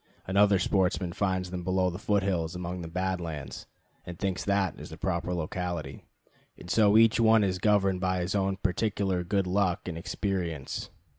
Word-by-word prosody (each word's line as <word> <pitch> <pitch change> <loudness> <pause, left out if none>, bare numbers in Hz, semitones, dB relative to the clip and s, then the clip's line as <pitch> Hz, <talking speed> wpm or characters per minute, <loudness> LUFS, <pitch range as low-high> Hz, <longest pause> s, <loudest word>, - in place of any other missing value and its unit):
Another 100 +1 +4
sportsman 90 -2 0
finds 95 -2 -1
them 90 -1 -4
below 95 0 +1
the 90 - -7
foot 100 -1 +1
hills 85 -4 -1
among 90 0 -4
the 85 - -6
Bad 90 +2 -2
Lands, 75 -4 -6 0.4
and 90 -1 -8
thinks 95 -1 -2
that 100 -4 0
is - - -9
the - - -9
proper - - -2
locality; 90 0 -4 0.5
and 90 - -8
so 105 -1 +5
each 115 0 +5
one 110 -1 +5
is 95 -2 0
governed 95 -2 +2
by 95 -1 0
his 90 +2 -2
own 95 -1 0
particular 95 -1 0
good 100 +2 0
luck 90 -1 0
and 85 -2 -4
experience. 85 -6 -3
95 Hz, 175 wpm, -28 LUFS, 90-100 Hz, 0.5 s, so